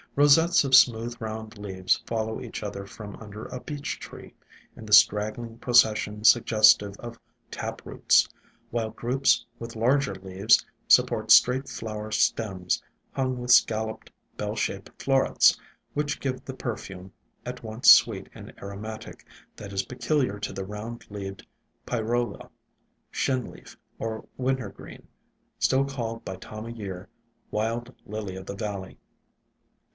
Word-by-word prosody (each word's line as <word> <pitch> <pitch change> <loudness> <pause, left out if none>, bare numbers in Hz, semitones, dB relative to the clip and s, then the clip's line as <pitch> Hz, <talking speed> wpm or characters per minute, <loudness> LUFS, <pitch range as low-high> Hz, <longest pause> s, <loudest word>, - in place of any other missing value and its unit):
Rosettes 145 +3 +5
of 135 -1 +5
smooth 120 0 +5
^ - - -25
AjU - - -29
round 110 -1 -6
leaves 95 -3 -1
follow 110 -1 -2
WILD - - -4
BLUE - - -8
PHLOX - - -7
each - - -6
other 100 -1 -5
from 100 0 -10
under 105 -1 -9
a 125 - -7
Beech 145 -2 -5
tree, - - -11 0.4
in 110 - -11
the 105 - -10
strag 105 +1 +5
gling 115 -1 -9
procession 110 -3 +3
suggestive 110 -3 +5
of 120 -1 -9 0.3
tap - - -6
roots, - - +3 0.4
while 115 -1 -1
groups 125 +5 +1
with 115 -1 -8
larger 125 -1 +1
leaves 95 +3 +2 0.2
support - - +4
straight 130 +2 +6
flower 110 -1 -6
stems 95 -4 0 0.3
hung 130 -1 -1
with 125 0 -1
scalloped, 110 -2 +2 0.2
bell - - -3
shaped - - -3
florets, - - +4 0.4
which 145 0 -2
give 130 -2 -3
the 135 - -7
perfume, 95 -7 -6 0.3
at 125 0 -7
once 110 +2 +2
sweet - - +6
and - - -11
aromatic, 105 +2 -8 0.3
that 100 -1 -9
is 95 -1 -1
peculiar 125 -3 -1
to - - -4
the 95 - -5
Round 105 +4 -7
leaved 95 -2 -7 0.4
Pyrola, 120 -2 -2 0.6
Shinleaf 130 -2 -3 0.2
or 110 -1 -4
Wintergreen, 130 -5 -4 0.5
still 135 +1 +3
called 115 -5 -5
by 95 - -5
Time 110 +1 -9
o' - - -7
Year 100 -5 -7 0.4
Wild 115 +3 -2
Lily 105 -3 -5
of 95 0 -9
the 100 - -5
Valley. 100 -2 -5
110 Hz, 145 wpm, -26 LUFS, 105-125 Hz, 0.6 s, straight